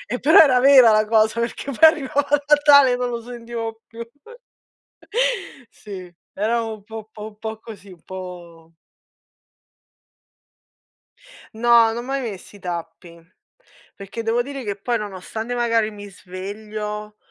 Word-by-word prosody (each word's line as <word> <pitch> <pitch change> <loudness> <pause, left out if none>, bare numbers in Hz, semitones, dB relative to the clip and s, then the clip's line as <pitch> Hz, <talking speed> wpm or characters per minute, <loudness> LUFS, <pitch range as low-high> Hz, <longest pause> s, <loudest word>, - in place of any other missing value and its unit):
mh. 230 - -3
Eh, - - -2
però 300 +6 +5
era 265 -5 +7
vera 260 -2 +7
la 215 0 +3
cosa, 220 +1 +2
perché 235 +3 -3
poi 300 +5 +7
arrivava 285 -2 -1 0.2
Natale 290 -3 +6
e - - +1
non 250 0 -2
lo 235 -1 -5
sentivo 230 -1 -7
più. 230 +1 -9 1.7
Sì, 185 -4 -10 0.2
era 225 +4 0
un 220 -2 -7
po' 220 0 -10
po' 215 0 -10
po' 220 0 -7
così, 205 -4 -12
un 175 -3 -16
po'... 175 -3 -10 2.8
No, 235 0 +5
non - - -6
ho - - -3
mai 270 +2 -3
messo 205 -5 -8
i - - -14
tappi, 170 -1 -7 0.8
perché 200 +3 -7
devo 230 +2 0
dire 275 0 -7
che 205 -3 -3
poi 235 +4 -2
nonostante 210 +4 -6
magari 230 -2 +1
mi 205 -1 -10
sveglio, 210 +3 -7
220 Hz, 140 wpm, -21 LUFS, 200-240 Hz, 2.8 s, era